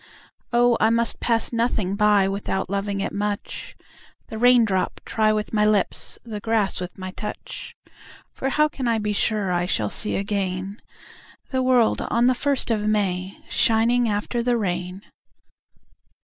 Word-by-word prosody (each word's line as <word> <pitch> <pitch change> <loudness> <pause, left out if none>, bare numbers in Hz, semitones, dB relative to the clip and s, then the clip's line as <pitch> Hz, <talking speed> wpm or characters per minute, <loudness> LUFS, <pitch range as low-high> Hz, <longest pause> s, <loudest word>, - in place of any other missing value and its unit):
Oh 240 -1 +4
I 220 - +4
must 230 0 0
pass 230 0 0
nothing 225 -5 0
by 205 -2 +4
Without 195 -1 -3
loving 200 0 -2
it - - -3
much, 205 0 -4 0.5
The 220 - -6
raindrop 230 -6 +3
try 215 -1 +2
with 215 0 -2
my 210 -1 +3
lips, 210 -2 +1
The 220 -3 -6
grass 215 -3 0
with 180 0 -6
my 185 0 -6
touch; 210 +2 -7 0.6
For 270 - -2
how 300 +2 +3
can 270 -4 -4
I 230 -1 +2
be 210 -1 -1
sure 205 -2 0
I 175 0 0
shall 105 - -1
see 210 - -1
again 195 0 -3 0.7
The 260 -1 +1
world 255 -3 +3
on 235 +2 +2
the 255 - +5
first 270 -1 0
of 215 -2 +1
May 195 -3 -1
Shining 230 +1 +2
after 210 +3 -1
the 240 0 +1
rain? 180 -1 -3
210 Hz, 155 wpm, -23 LUFS, 195-235 Hz, 0.7 s, the